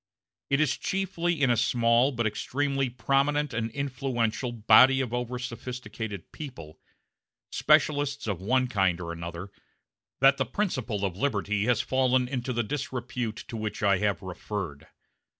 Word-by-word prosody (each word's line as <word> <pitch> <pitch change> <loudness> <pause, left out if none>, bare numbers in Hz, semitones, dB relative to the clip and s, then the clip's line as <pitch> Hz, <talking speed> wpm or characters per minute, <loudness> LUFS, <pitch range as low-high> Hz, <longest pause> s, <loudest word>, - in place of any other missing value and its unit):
It 140 - +2
is 150 -2 +2
chiefly 175 -4 -1
in 130 - +4
a - - +4
small, 115 +3 +3
but 115 -3 -2
extremely 135 +4 -1
prominent 140 +4 +1
and 115 0 -1
influential, 130 -3 -2
body 130 +4 +6
of 125 -3 -2
over 125 0 -2
sophisticated 115 -5 -6
people 120 - -9 0.7
specialists 145 -2 +2
of 100 -5 -3
one 130 +6 +2
kind 95 -7 +1
or 85 -1 -5
another 85 +3 -7 0.7
that 135 +1 +6
the - - 0
principle 125 - -1
of 95 -3 -3
liberty 105 -5 0
has 125 -1 +2
fallen 130 -1 +2
into 125 0 -3
the 120 -1 0
disrepute 120 -2 -4
to - - -7
which 110 -1 -4
I 100 -2 +4
have 100 -4 0
referred. 95 -4 -5
120 Hz, 145 wpm, -27 LUFS, 105-135 Hz, 0.7 s, body